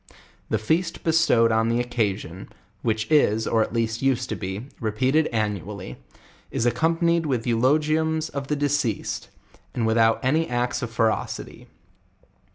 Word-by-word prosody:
The - - +1
feast 165 +9 -1
bestowed 160 -8 +3
on 110 +1 +2
the 115 +1 +1
occasion, 105 -7 -2 0.3
which 110 -1 0
is, 110 -8 +3
or 115 - +2
at - - -1
least 115 0 -1
used 135 -2 +1
to - - -2
be, 95 +4 -5
repeated 130 +8 +1
annually, 105 - -3 0.5
is 115 - -1
accompanied 165 +6 +2
with 125 -5 -1
eulogiumson 150 +4 +1
the 150 - 0
deceased, 140 -7 -1 0.5
and 115 - 0
without 115 0 +3
any 155 +5 +2
^icts 125 +2 -1
of 120 - -3
fe 115 0 0
rocity. 110 -1 -2
120 Hz, 140 wpm, -24 LUFS, 110-150 Hz, 0.5 s, bestowed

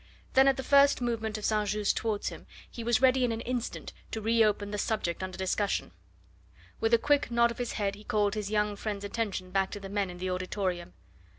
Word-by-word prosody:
Then 265 +1 +6
at 270 - +4
the 265 - -3
first 280 +1 +5
movement 225 -3 -2
of 210 - -5
St. 210 -1 +1
Just 210 0 +1
towards 215 -2 -1
him - - -11 0.2
he 235 - -8
was 235 +2 +2
ready 260 0 +5
in 245 - +2
an 225 0 -3
instant 245 -1 -4 0.2
to 225 - -4
re 225 +1 +3
open 205 -1 0
the 210 - -3
subject 190 -7 -1
under 185 -1 -5
discussion. 190 +2 -1 0.9
With 450 +1 +4
a - - +4
quick 290 - +2
nod 235 0 +3
of 235 - -9
his 245 - -2
head 200 -2 -1
he 205 +1 -11
called 210 -1 +1
his 210 -2 -3
young 210 -1 +1
friend's 205 -1 -4
attention 200 -4 -3
back 195 0 +1
to 205 - -6
the 195 -1 -8
men 200 -1 -1
in 175 - -8
the 185 +1 -3
auditorium. 180 -1 -3
210 Hz, 225 wpm, -29 LUFS, 200-235 Hz, 0.9 s, Then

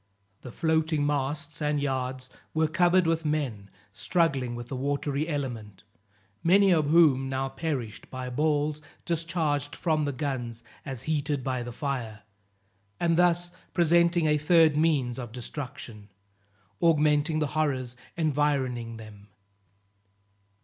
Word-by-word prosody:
The 125 - -9
floating 160 -1 +1
masts 145 +2 -2
and 150 0 +1
yards 130 -2 -2 0.3
were 160 0 +3
covered 175 +3 +3
with 165 0 +1
men 135 -10 -2 0.2
struggling 135 -4 0
with 120 0 -7
the 135 - -5
watery 140 +2 -1
element, 120 - -5 0.6
many 195 +3 +5
of 155 -4 +3
whom 145 -5 +5
now 135 0 -1
perished 135 -6 -4
by 130 -1 -5
balls 150 +2 0 0.2
discharged 160 -4 -1
from 155 -3 0
the 145 - -1
guns 125 -5 -4 0.2
as 130 -3 -5
heated 145 -3 -1
by 130 -1 -1
the 120 0 -6
fire, 120 -6 -4 0.8
and 170 -1 +2
thus 175 0 +2 0.2
presenting 170 0 +4
a 150 -1 +3
third 160 0 +5
means 145 -6 +1
of 120 -3 -6
destruction, 120 -4 -7 0.7
augmenting 155 -1 +3
the 150 -2 0
horrors 130 -5 -1 0.2
environing 135 -7 0
them. 105 -2 -12
145 Hz, 125 wpm, -27 LUFS, 130-160 Hz, 0.8 s, many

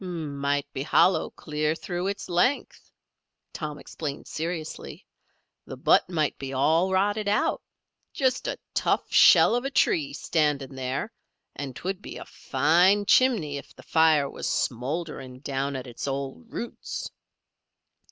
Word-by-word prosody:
"Might 145 -5 -2
be 130 - -3
hollow 180 +6 +3
clear 150 0 -2
through 175 +2 -4
its 200 0 -4
length," 180 +10 0 0.6
Tom 150 -2 -5
explained 145 -2 -6
seriously. 160 -1 -5 0.6
"The - - -7
butt - - +3
might 155 -5 -1
be 135 -1 -5
all 160 +8 +2
rotted 205 +2 +1
out. 205 +1 +1 0.5
Just 260 -2 0
a - - -2 0.2
tough - - 0
shell - - +7
of 245 +1 0
a 275 - -1
tree 300 -1 +2
standing 150 - 0
there, 130 - -3 0.4
and 135 -3 -6
'twould 190 +5 -4
be - - -8
a - - -8
fine 185 +5 +3
chimney 200 - +3
if 140 - -11
the - - -14
fire 160 -3 +4
was - - -4
smouldering 135 +1 -3
down 140 -1 -2
at 130 - -5
its 120 +2 -6
old 140 - -5
roots." 235 - -6
160 Hz, 140 wpm, -26 LUFS, 140-190 Hz, 0.6 s, shell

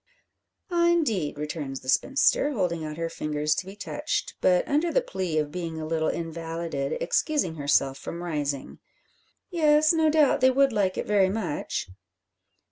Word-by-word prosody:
"Ah, 340 -1 +3
indeed," 220 - 0
returns 150 -3 -5
the - - -14
spinster, 280 - +3
holding 175 - -1
out 155 0 -6
her 165 0 -2
fingers 150 -1 -1
to 185 - -4
be 195 - -9
touched, 295 +8 -3
but, 180 -1 +3
under 310 +4 +1
the - - +3
plea 185 - -3
of 150 -1 0
being 165 -2 -4
a 155 - -4
little 160 0 0
invalided, 165 -3 -3
excusing 185 - 0
herself 140 -2 +1
from 170 +5 -6
rising. 145 -5 -3 0.7
"Yes; 310 -2 +4
no 320 -1 +3
doubt 305 -4 +3
they 260 - +6
would 270 0 +3
like 195 -3 0
it - - -2
very 200 -2 +3
much." 185 - -3
175 Hz, 160 wpm, -26 LUFS, -, 0.7 s, they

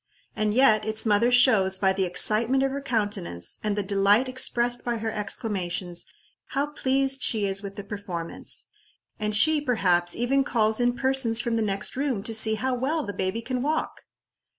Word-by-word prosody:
And 210 0 -1
yet 230 -5 +4
its 220 +1 -1
mother 220 +2 +3
shows, 220 -7 +4
by 190 -1 +2
the 190 0 0
excitement 225 +8 +2
of 270 - 0
her 280 +1 -4
countenance, 205 - -3
and 210 -1 -1
the 205 - -1
delight 200 +5 +3
expressed 245 -1 0
by 240 -1 -2
her 220 0 -3
exclamations, 195 -5 -3 0.4
how 285 +1 -2
pleased 270 0 0
she 215 -3 +1
is 195 0 -1
with 200 -1 -8
the 205 - -7
performance; 195 -5 -6 0.5
and 210 0 0
she, 310 +7 +5
perhaps, 180 -10 +1
even 270 +3 +1
calls 220 -4 0
in 245 0 +1
persons 260 -3 +3
from 235 -1 -1
the 225 - 0
next 195 -2 -2
room 260 -7 -2
to 225 - -3
see 220 0 0
how 260 +4 -2
well 285 +6 -1
the 205 - -5
baby 190 +5 -3
can 250 0 -3
walk! 305 +4 -2
220 Hz, 180 wpm, -25 LUFS, 200-255 Hz, 0.5 s, she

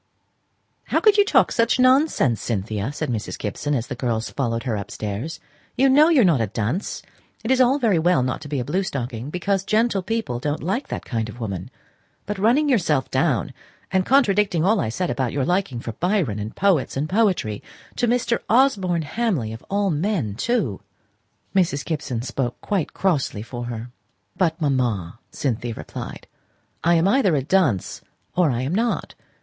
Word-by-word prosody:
"How - - +1
could 425 -2 +5
you 410 - +7
talk 405 - +3
such 230 +2 +2
nonsense, 255 - +3
Cynthia!" 105 +1 -2
said 150 -2 -3
Mrs. 110 -3 -4
Gibson, 140 +8 -2
as 120 -3 -1
the - - -5
girls 115 -2 -2
followed 115 -4 -2
her 120 -4 -1
upstairs. 105 +7 -5 0.4
"You 270 +2 +5
know 295 +4 +6
you 310 -6 +5
are - - +5
not 160 -9 +3
a 110 - 0
dunce. 115 - -3 0.4
It 225 - -1
is 260 0 +4
all 255 +2 +4
very 220 - +2
well 170 -4 +3
not 130 - -2
to 150 - -8
be 145 -2 -2
a 125 - -3
blue 170 +8 0
stocking, 130 - -4
because 185 +3 -1
gentle 215 -1 +1
people 220 - -2
don't 145 +3 -2
like 195 - -1
that - - -5
kind 115 -3 -2
of 120 - -10
woman; 95 -6 -4 0.6
but 205 -1 -4
running 245 +9 +3
yourself 165 - +1
down, 135 0 +1 0.4
and 190 0 +2
contradicting 205 - +3
all 215 +2 +3
I 110 - -1
said 175 +10 -2
about 130 -4 -1
your 140 -2 0
liking 175 -8 0
for 115 - -5
Byron, 175 - 0
and 105 +1 -6
poets 190 -10 +1
and 145 +3 -1
poetry 185 - +1 0.4
to 240 -1 +1
Osborne 200 -9 +3
Hamley 155 - -1
of 115 - -10
all 200 -1 +1
men, 160 - -1
too!" 145 - -1 0.7
Mrs. 160 -7 +1
Gibson 140 -8 -3
spoke 125 0 -3
quite 195 -7 -2
crossly 150 - 0
for 120 +1 -6
her. 120 0 -6 0.4
"But, 175 -3 +1
mamma," 120 - -1
Cynthia 120 -3 -2
replied, - - -8 0.6
"I 170 +1 +4
am 165 +2 +3
either 200 - +3
a 135 - 0
dunce, 145 - +1 0.3
or 175 -3 +3
I 125 -1 -1
am 140 +6 -2
not. 230 +4 -1
155 Hz, 180 wpm, -23 LUFS, -, 0.7 s, you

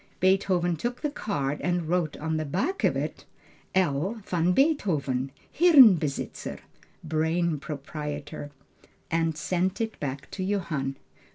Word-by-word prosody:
Beethoven 185 -2 +2
took 240 +8 -3
the 295 - -1
card 145 - -2
and 175 -2 0
wrote 170 -2 0
on 160 +1 -2
the 155 - -1
back 195 - -2
of - - +3
it - - -4 0.5
L. 180 +3 +1
VAN 175 0 +1
BEETHOVEN 160 - +1 0.3
Hirnbesitzer 230 - +5 0.5
(Brain 160 0 0
proprietor). 145 0 -6 0.6
and 165 -1 +1
sent 180 +4 -1
it 225 -1 -3
back 140 -1 -5
to 190 - -4
Johann. 170 -9 -1
165 Hz, 120 wpm, -27 LUFS, 150-190 Hz, 0.6 s, Hirnbesitzer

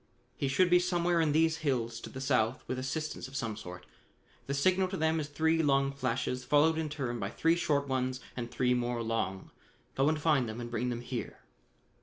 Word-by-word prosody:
"He 140 - -1
should 175 +7 +3
be 180 - +7
somewhere 175 -1 +1
in 155 -2 +2
these 160 +1 +3
hills 120 -7 -1
to - - -8
the 130 - -8
south 125 -3 +1
with 130 - -2
assistance 145 +1 -3
of 135 - -12
some 115 -5 -2
sort. 90 -4 -9 0.6
The 140 - -1
signal 185 +6 +3
to 190 +1 -4
them 160 0 +1
is 150 - -3
three 160 +2 +1
long 140 -2 +2
flashes 130 -1 -2
followed 160 +2 +3
in 160 -1 -2
turn 130 -5 -3
by - - -2
three 165 +1 +2
short 145 -4 0
ones 130 -1 -1 0.2
and 120 -1 -4
three 125 +1 +1
more 120 -1 -1
long. 110 -4 -2 0.4
Go 135 +2 +3
and 155 -1 0
find 145 -6 +2
them 110 +2 -6
and 120 0 -6
bring 120 +1 -1
them 120 -1 -3
here. 120 -1 -5
135 Hz, 210 wpm, -31 LUFS, 120-160 Hz, 0.6 s, be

